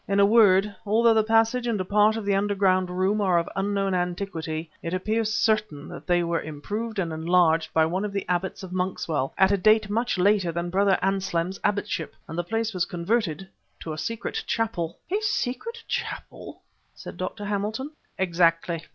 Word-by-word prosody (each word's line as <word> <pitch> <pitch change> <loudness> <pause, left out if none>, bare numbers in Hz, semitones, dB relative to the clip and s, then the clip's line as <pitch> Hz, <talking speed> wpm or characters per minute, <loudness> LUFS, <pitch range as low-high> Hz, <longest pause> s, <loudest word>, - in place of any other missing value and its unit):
In 200 0 +1
a 200 - +7
word, 205 -2 +5
although 225 +2 +4
the 220 -1 +3
passage 225 +2 +2
and 225 -4 0
a 185 - -2
part 210 +3 +3
of 220 - -5
the 200 - +2
underground 195 -2 +2
room 190 +4 0
are 185 -3 +3
of 170 - 0
unknown 195 0 0
antiquity, 175 -3 -3
it 170 +2 -3
appears 220 +3 0
certain 210 -9 0
that - - -10
they 175 -1 +3
were 170 -1 -1
improved 205 +10 -5
and 170 -4 -1
enlarged 165 0 +2
by 160 0 +3
one 180 +5 -1
of 210 - -3
the 200 -1 -3
abbots 180 +2 -2
of 185 - -8
Monkswell 175 -6 -1
at 190 +1 +5
a 200 - +3
date 215 +1 +3
much 230 0 0
later 190 -1 +3
than 170 +1 -3
Brother 195 +1 +3
Anselm's 190 -1 -1
abbotship 205 -5 -1
and 160 - -7
the 175 - -1
place 225 +3 -2
was 180 -2 0
converted 180 -1 -1 0.3
to 160 - -5
a - - -7
secret 230 +8 -3
chapel 190 -8 -2
" - - -29
"A 415 - +1
secret 435 - -2
chapel!" - - -5 0.3
said - - -9
Dr. 205 -2 -5
Hamilton. 210 +7 -2 0.3
"Exactly. 170 -2 +1
195 Hz, 185 wpm, -25 LUFS, 175-215 Hz, 0.3 s, a